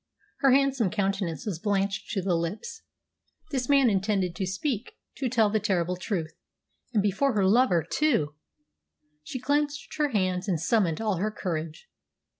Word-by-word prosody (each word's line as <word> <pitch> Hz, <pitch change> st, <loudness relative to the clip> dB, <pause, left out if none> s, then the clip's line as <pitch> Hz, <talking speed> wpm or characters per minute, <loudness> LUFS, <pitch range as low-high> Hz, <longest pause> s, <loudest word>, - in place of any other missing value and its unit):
Her 275 Hz, -, +4 dB
handsome 270 Hz, -5 st, +3 dB
countenance 195 Hz, -6 st, -2 dB
was 190 Hz, -7 st, -3 dB
blanched 200 Hz, 0 st, -1 dB
to 195 Hz, -4 st, -1 dB
the 185 Hz, -1 st, +1 dB
lips. 170 Hz, -, -3 dB, 0.7 s
This 260 Hz, -3 st, -2 dB
man 275 Hz, -2 st, +5 dB
intended 195 Hz, -3 st, +1 dB
to 190 Hz, -3 st, -2 dB
speak 220 Hz, +5 st, -3 dB, 0.2 s
to 265 Hz, -2 st, -1 dB
tell 220 Hz, -4 st, +3 dB
the 215 Hz, -, +2 dB
terrible 180 Hz, -4 st, 0 dB
truth 180 Hz, -4 st, -3 dB, 0.6 s
and 215 Hz, -5 st, +2 dB
before 225 Hz, +7 st, +1 dB
her 200 Hz, -3 st, +2 dB
lover 195 Hz, -, +4 dB
too! 230 Hz, -, +1 dB, 0.9 s
She 255 Hz, -, -6 dB
clenched 290 Hz, +3 st, -1 dB
her 300 Hz, -1 st, +2 dB
hands 185 Hz, -6 st, 0 dB
and 175 Hz, -5 st, 0 dB
summoned 175 Hz, 0 st, +1 dB
all 210 Hz, -4 st, 0 dB
her 205 Hz, +5 st, 0 dB
courage. 165 Hz, -, -5 dB
205 Hz, 155 wpm, -27 LUFS, 180-250 Hz, 0.9 s, man